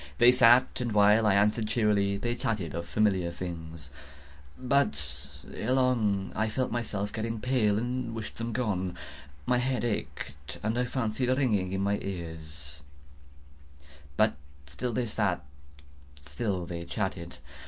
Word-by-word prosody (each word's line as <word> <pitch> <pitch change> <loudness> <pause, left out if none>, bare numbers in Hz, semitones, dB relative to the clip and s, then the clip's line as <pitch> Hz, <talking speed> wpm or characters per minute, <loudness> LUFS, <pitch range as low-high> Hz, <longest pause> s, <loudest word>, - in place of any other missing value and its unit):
They 120 - +8
sat, 125 0 +5
and 120 -3 -1
while 105 +1 +5
I 100 - +4
answered 105 +2 +2
cheerily, 105 -3 +2
they 120 +4 -1
chatted 105 - -2
of 85 +1 -4
familiar 95 -5 +2
things. 80 -4 -7 0.7
But, 75 - 0 0.2
ere 125 +4 -1
long, 115 -7 +2
I 110 +2 +1
felt 130 +4 -1
myself 105 -4 -2
getting 115 0 -3
pale 110 -4 +2
and 120 0 -2
wished 110 -2 -6
them 115 0 -2
gone. 95 -7 -1 0.5
My 125 - +2
head 125 -1 0
ached, 70 - -4
and 110 +2 0
I 125 - +2
fancied 125 0 -1
a 130 - +4
ringing 105 -9 +1
in 95 0 -1
my 100 +1 +1
ears: 80 -6 -6 1.4
but - - +4 0.3
still 120 - -4
they 125 +1 0
sat 100 -7 -1 0.7
and 70 +1 -18
still 90 +4 -2 0.2
chatted. 95 -5 -3
105 Hz, 145 wpm, -29 LUFS, 90-120 Hz, 1.4 s, They